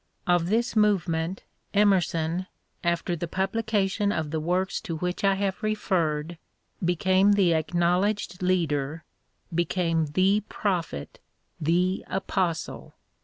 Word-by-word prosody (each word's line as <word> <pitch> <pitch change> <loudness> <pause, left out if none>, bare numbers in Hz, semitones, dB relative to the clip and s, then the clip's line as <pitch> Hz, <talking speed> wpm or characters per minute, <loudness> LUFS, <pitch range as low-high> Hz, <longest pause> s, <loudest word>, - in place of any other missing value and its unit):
* - - -41
Of 170 -1 0
this 230 +3 +1
move 210 -4 +3
ment 165 +3 -2 0.3
Emerson, 185 -3 +2 0.4
after 170 0 0
the 170 +1 -4
publication 200 +2 0
of 160 -6 -2
the 160 - -1
works 180 +4 -1
to 175 -7 -4
which 180 +4 -3
I 195 -1 +4
have 195 -1 -2
referred, 170 -7 -1 0.4
became 185 +3 +3
the 195 -4 +4
acknow 175 +2 +2
ledged 205 -3 -2
leader, 160 -4 0 0.5
became 165 -1 +1
the 190 +7 +2
prophet, 175 - -3 0.4
the 180 +4 +1
apostle. 185 -3 -2
180 Hz, 120 wpm, -26 LUFS, 165-195 Hz, 0.5 s, I